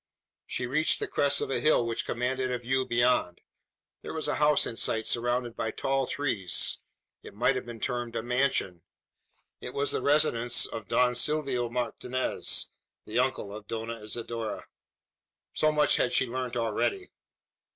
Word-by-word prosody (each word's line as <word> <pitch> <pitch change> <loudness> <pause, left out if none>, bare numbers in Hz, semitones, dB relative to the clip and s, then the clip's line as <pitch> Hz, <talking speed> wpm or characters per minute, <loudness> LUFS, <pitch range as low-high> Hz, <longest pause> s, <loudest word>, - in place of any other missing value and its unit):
She 125 - -2
reached 150 +6 +1
the - - -2
crest 145 0 +2
of - - -2
a - - +1
hill 155 -6 +3
which 115 -1 -2
commanded 130 +2 -1
a 125 - 0
view 130 +2 -1
beyond. 120 -7 +2 0.6
There - - -7
was 160 - -2
a - - 0
house 150 0 +4
in 115 - -4
sight 110 -1 +1
surrounded 120 0 0
by 110 - -2
tall 135 +2 -1
trees. 105 - 0 0.4
It - - -12
might 120 +5 +3
have 130 - -4
been 120 -1 -7
termed 120 0 -3
a 115 - -2
mansion. 125 -8 0 0.8
It - - -7
was 140 0 +2
the - - -1
residence 130 -5 +3
of 110 -4 -7
Don 125 +3 +3
Silvio 130 -3 +1
Martinez, 125 +1 -1 0.3
the 110 +3 -1
uncle 125 -6 -1
of 105 -1 -10
Dona 115 0 -5
Isidora. 115 0 -4 0.9
So 155 - +3
much 150 -1 +3
had 125 - +1
she - - +3
learnt 125 0 -4
already. 370 - -1
125 Hz, 160 wpm, -28 LUFS, 115-135 Hz, 0.9 s, house